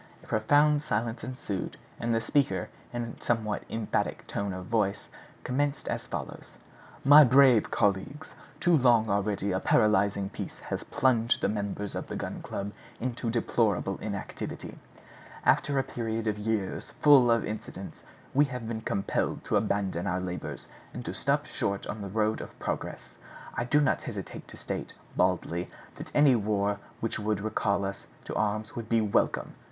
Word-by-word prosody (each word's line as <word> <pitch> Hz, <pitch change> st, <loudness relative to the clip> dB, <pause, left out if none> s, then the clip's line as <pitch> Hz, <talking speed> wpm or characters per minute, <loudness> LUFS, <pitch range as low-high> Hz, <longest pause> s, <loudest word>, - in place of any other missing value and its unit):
A -, -, -14 dB
profound 145 Hz, +7 st, +3 dB
silence 115 Hz, -4 st, -2 dB
ensued, 115 Hz, -6 st, -4 dB, 0.2 s
and 120 Hz, -, -1 dB
the 115 Hz, 0 st, +2 dB
speaker, 115 Hz, -8 st, +1 dB, 0.2 s
in 120 Hz, 0 st, -2 dB
a 115 Hz, -, -8 dB
somewhat 110 Hz, -3 st, 0 dB
emphatic 110 Hz, -2 st, -1 dB
tone 100 Hz, -1 st, -2 dB
of 90 Hz, 0 st, -6 dB
voice, 105 Hz, -2 st, 0 dB, 0.3 s
commenced 140 Hz, +3 st, -1 dB
as -, -, -3 dB
follows: -, -, -6 dB, 0.5 s
"My 145 Hz, +2 st, +10 dB
brave, 130 Hz, -3 st, +6 dB
colleagues, 105 Hz, +10 st, 0 dB, 0.3 s
too 175 Hz, -1 st, +4 dB
long 120 Hz, -6 st, +4 dB
already 100 Hz, 0 st, 0 dB
a 95 Hz, -, +1 dB
paralyzing 100 Hz, -3 st, +3 dB
peace -, -, -6 dB
has -, -, -5 dB
plunged 125 Hz, -5 st, +2 dB
the -, -, +2 dB
members 100 Hz, -1 st, -3 dB
of -, -, -4 dB
the -, -, -5 dB
Gun -, -, -4 dB
Club 100 Hz, +1 st, -4 dB, 0.3 s
in 125 Hz, +1 st, -1 dB
deplorable 115 Hz, -4 st, 0 dB
inactivity. 100 Hz, -2 st, -5 dB, 0.7 s
After 140 Hz, -1 st, +3 dB
a 135 Hz, -, +3 dB
period 115 Hz, -2 st, -3 dB
of 105 Hz, -1 st, -1 dB
years 105 Hz, -2 st, -2 dB
full 140 Hz, -5 st, +8 dB
of 115 Hz, -1 st, +3 dB
incidents 105 Hz, -3 st, -6 dB, 0.3 s
we 145 Hz, +2 st, +5 dB
have 125 Hz, -4 st, -5 dB
been 110 Hz, -1 st, -3 dB
compelled 100 Hz, -2 st, -1 dB
to -, -, -1 dB
abandon 100 Hz, -4 st, 0 dB
our 90 Hz, 0 st, 0 dB
labors, 90 Hz, -1 st, -5 dB, 0.3 s
and -, -, -6 dB
to -, -, -3 dB
stop -, -, +1 dB
short 100 Hz, 0 st, -2 dB
on 105 Hz, -, -5 dB
the 100 Hz, -, -5 dB
road 110 Hz, +2 st, +1 dB
of -, -, -10 dB
progress. -, -, -5 dB, 0.3 s
I 120 Hz, -, -1 dB
do 145 Hz, +4 st, +3 dB
not 145 Hz, -3 st, +2 dB
hesitate -, -, -7 dB
to -, -, -12 dB
state, -, -, -5 dB, 0.2 s
baldly, 90 Hz, -1 st, +1 dB, 0.3 s
that -, -, -7 dB
any 145 Hz, -3 st, +6 dB
war 100 Hz, -2 st, 0 dB, 0.2 s
which 115 Hz, -, -1 dB
would 105 Hz, -1 st, 0 dB
recall 100 Hz, -2 st, 0 dB
us 100 Hz, 0 st, -5 dB, 0.2 s
to -, -, -5 dB
arms 110 Hz, +1 st, -1 dB
would 115 Hz, -2 st, -5 dB
be 115 Hz, -, +4 dB
welcome!" 105 Hz, -2 st, +1 dB
110 Hz, 165 wpm, -29 LUFS, 100-120 Hz, 0.7 s, My